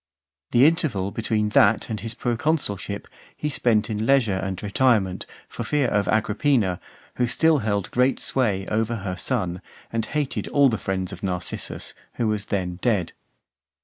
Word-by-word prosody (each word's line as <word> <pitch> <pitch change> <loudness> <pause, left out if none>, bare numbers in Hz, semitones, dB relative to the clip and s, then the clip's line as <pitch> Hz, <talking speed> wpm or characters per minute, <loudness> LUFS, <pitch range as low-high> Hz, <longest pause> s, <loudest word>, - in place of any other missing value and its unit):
The 120 +3 +5
interval 145 - +1
between 110 -1 0
that 105 +1 +4
and 110 - -2
his 115 +3 -5
proconsulship 120 -6 -1 0.3
he 150 - -2
spent 115 -5 +2
in 110 0 -2
leisure 130 -7 +4
and 95 0 -4
retirement, 105 -3 +1 0.2
for - - -6
fear 145 -4 +1
of 100 -2 +1
Agrippina, 110 - +1 0.4
who 125 - +2
still 160 +5 +3
held 100 -4 -1
great 125 +2 +2
sway 105 -7 0
over 110 +3 0
her 95 -4 -4
son, 90 -6 -2 0.3
and 115 -1 0
hated 150 -3 -2
all 140 -1 +4
the 110 -4 -2
friends 95 -1 -2
of - - -9
Narcissus, 90 -3 -4 0.2
who 115 - 0
was 105 -1 -1
then 90 -3 -2
dead. 105 -9 +1
110 Hz, 155 wpm, -24 LUFS, 100-125 Hz, 0.4 s, The